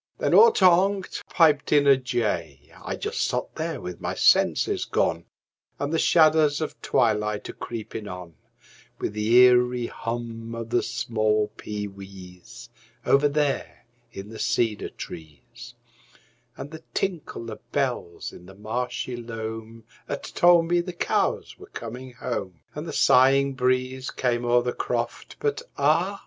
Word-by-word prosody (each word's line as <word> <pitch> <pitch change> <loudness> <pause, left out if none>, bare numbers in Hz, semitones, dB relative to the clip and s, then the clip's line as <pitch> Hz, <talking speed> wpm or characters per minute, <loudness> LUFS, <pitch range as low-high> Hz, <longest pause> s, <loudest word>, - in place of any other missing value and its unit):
Then - - 0
all 460 0 +8
ter 190 - +2
onct 190 +2 +3
piped 150 -4 +3
in 145 -1 +5
a 140 -1 +7
jay. 85 - -3
I - - -3
just - - -3
sot - - -1
there - - -4
with 90 -1 -8
my - - -3
senses - - +3
gone, - - 0 0.5
And 145 +2 -3
the 165 - +2
shadders 155 -2 +4
of 155 - -5
twilight 105 -2 0
a - - -6
creepin' 110 -2 -7
on, 90 -3 -8 0.6
With - - -3
the 105 +1 -1
eerie 125 -1 +5
hum 115 0 -5
of 115 0 -6
the 120 - +3
small 110 -2 0
pee 105 -1 -5
wees, 95 +4 -12 0.4
Over 140 +2 +4
there 145 -1 -2 0.3
in 95 +1 -9
the 110 - -9
cedar 115 -3 0
trees, 115 +10 -11 0.8
And 145 - -8
the 160 0 -9
tinkle 160 - -3
of - - -8
bells 125 -11 -2
in 90 - -13
the 95 - -13
marshy 125 +4 -4
loam 115 -1 -7 0.3
'At 140 - -4
told 175 -1 +4
me 175 0 +2
the 180 +1 -7
cows 170 - -1
were - - -12
coming 125 +2 -8
home, 95 -10 -5
And 150 +3 -6
the - - -4
sighing 135 0 +4
breeze 130 0 0
came 120 -1 -1
o'er 120 0 +3
the 125 - -2
croft, 120 -1 -3
But 145 -1 -1 0.2
ah! 165 +8 +2
120 Hz, 150 wpm, -25 LUFS, 110-145 Hz, 0.8 s, all